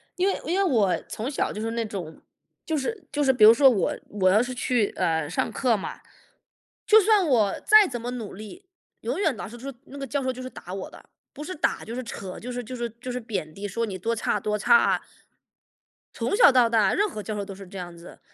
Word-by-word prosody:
因 370 +2 +1
为 - - 0
因 350 +4 0
为 395 - +3
我 220 - +2
从 225 +4 -4
小 280 - -1
就 210 - -5
是 225 +1 -2
那 230 -1 -2
种 180 -6 -7 0.4
就 320 -2 -1
是 400 +11 -4
就 290 0 0
是 265 - +5
比 240 - +2
如 220 +2 +10
说 270 +2 +6
我 210 -6 +1 0.2
我 190 -2 +2
要 210 +4 +5
是 255 +1 -3
去， 245 -4 +1
呃， 160 -4 0
上 - - -1
课 250 -4 +1
嘛， - - -6 0.9
就 435 +1 +7
算 420 -2 +4
我 220 -7 +2
再 430 -2 +7
怎 240 -3 -5
么 245 +1 -4
努 230 -5 -6
力， 215 - -11 0.4
永 - - -3
远 315 - +1
老 - - -6
师 240 - -10
说 270 +3 -7
那 280 - -11
个 275 - -4
教 280 +3 -1
授 260 - 0
就 255 - -8
是 255 - -6
打 180 - -10
我 190 0 -5
的， - - -16 0.2
不 295 - -8
是 370 +4 -6
打 - - -1
就 230 - -6
是 255 - -4
扯， 195 -4 -7
就 250 - -7
是 245 0 -4
就 255 +3 -7
是 235 -1 -3
就 250 0 -5
是 250 - -3
贬 200 -9 -5
低， 205 +3 -6
说 230 +4 -2
你 190 -3 -5
多 230 +5 -1
差 210 -1 -1
多 210 +1 -1
差。 470 - +4 1.1
从 - - -1
小 345 - +7
到 250 -3 +5
大， 220 -4 +2
任 415 +2 +2
何 215 - -6
教 210 +2 -5
授 205 -1 -3
都 195 - -8
是 195 -1 -11
这 195 +1 -10
样 175 -1 -7
子， 170 +1 -13
235 Hz, 270 characters per minute, -25 LUFS, 205-275 Hz, 1.1 s, 如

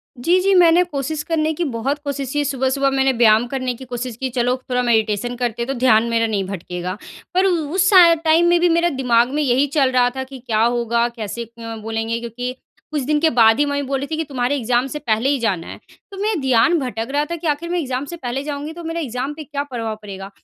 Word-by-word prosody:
जी, 335 +9 +2
जी, 390 +1 +3
मैंने 350 0 +6
कोशिश 300 -2 -4
करने 315 -2 0
की 345 - -2
बहुत 275 +6 -2
कोशिश 280 -2 -4
की, 295 0 +1
सुबह-सुबह 275 0 0
मैंने 270 0 +2
व्यायाम 225 -1 +4
करने 255 -1 -2
की 260 +2 -11
कोशिश 245 -1 -5
की, 260 0 -3
चलो 250 0 0
थोड़ा 250 0 +1
मेडिटेशन 225 0 0
करते 240 -1 -3
हैं 235 - -2
तो 270 - -1
ध्यान 225 -3 +4
मेरा 230 0 +1
नहीं 205 -3 -1
भटकेगा। 180 0 -5 0.4
पर 370 +1 +3
उ 370 -2 +3 0.2
उस 375 0 +4
सा 355 -4 +8
टाइम 325 +1 +3
में 345 - +4
भी 350 +1 +3
मेरा 340 +1 +3
दिमाग 245 -4 +2
में 300 - 0
यही 265 +2 +2
चल 265 -3 +3
रहा 245 -1 +3
था 265 - -3
कि 265 0 -11
क्या 225 -3 -1
होगा 235 0 +1
कैसे 235 0 -6
अ, 230 0 -9
बोलेंगे 225 +1 -2
क्योंकि 245 +2 -5 0.4
कुछ 300 - -1
दिन 300 0 +1
के 320 +1 +3
बाद 225 -2 +5
ही 295 - +4
मम्मी 285 0 -1
बोल 270 0 -2
रही 280 - -4
थी 315 +1 -3
कि, 325 - -1
"तुम्हारे 265 -1 -1
एग्ज़ाम 245 0 +1
से 300 +3 -5
पहले 225 +3 0
ही 285 - +1
जाना 195 -8 -1
है।" - - -8 0.3
तो 390 - -9
मैं 415 -2 -1
ध्यान 265 +7 +3
भटक 235 -4 -4
रहा 290 +1 +1
था - - -1
कि 330 0 -5
आखिर 300 +3 -1
मैं 355 0 0
एग्ज़ाम 265 -2 -3
से 345 - -7
पहले 265 0 -4
जाऊँगी 295 +1 -5
तो 345 - -9
मेरा 330 +1 -3
एग्ज़ाम 260 0 -3
पे 310 +1 -8
क्या 285 0 -4
प्रभाव 230 -6 -4
पड़ेगा। 195 -1 -8
260 Hz, 245 wpm, -20 LUFS, 235-300 Hz, 0.4 s, सा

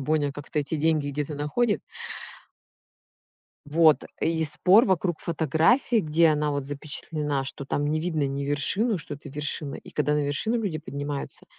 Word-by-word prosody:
Боня 145 0 +1
как-то 145 +2 -5
эти 145 +2 -1
деньги 155 -1 +1
где-то 145 +1 -3
находит. 205 +11 0 1.9
Вот, 155 +1 +4 0.2
и 160 -1 +1
спор 180 - +5
вокруг 180 -3 0
фотографии, 165 - +2
где 160 -1 +3
она, 150 -1 +1
вот, 140 -1 -2
запечатлена, 145 0 -3
что 135 +1 -6
там 145 +1 -1
не 155 +1 0
видно 160 -4 0
ни 140 +1 -3
вершину, 185 - +1
что 150 -2 -6
это 145 - -11
вершина. 145 0 -3
И - - -10
когда 150 0 +1
на 150 - +1
вершину 145 +12 0
люди 200 -9 -2
поднимаются, 145 -2 -5
150 Hz, 155 wpm, -26 LUFS, 145-165 Hz, 1.9 s, спор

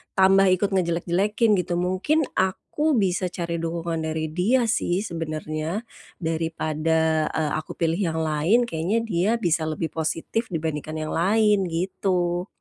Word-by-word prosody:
tambah 195 +1 +5
ikut 185 +2 +2
ngejelek-jelekin, 190 +5 +1
gitu. 175 0 -2
Mungkin 185 - +1
aku 285 +11 0
bisa 185 -4 +1
cari 170 -1 -3
dukungan 165 -1 -2
dari 155 0 -2
dia 215 +10 +2
sih 200 -4 0
sebenarnya. 160 +1 -4 0.4
Daripada, 160 -1 0
eee, 155 -2 -1
aku 155 - -9
pilih 165 +1 0
yang 160 0 -2
lain, 160 +10 +2
kayaknya 205 +2 -1
dia 195 -2 +1
bisa 170 -7 0
lebih 160 +1 -3
positif 165 +8 -2
dibandingkan 155 -3 -3
yang 155 0 -3
lain, 205 +2 +3
gitu. 180 0 -1
175 Hz, 135 wpm, -24 LUFS, 160-195 Hz, 0.4 s, tambah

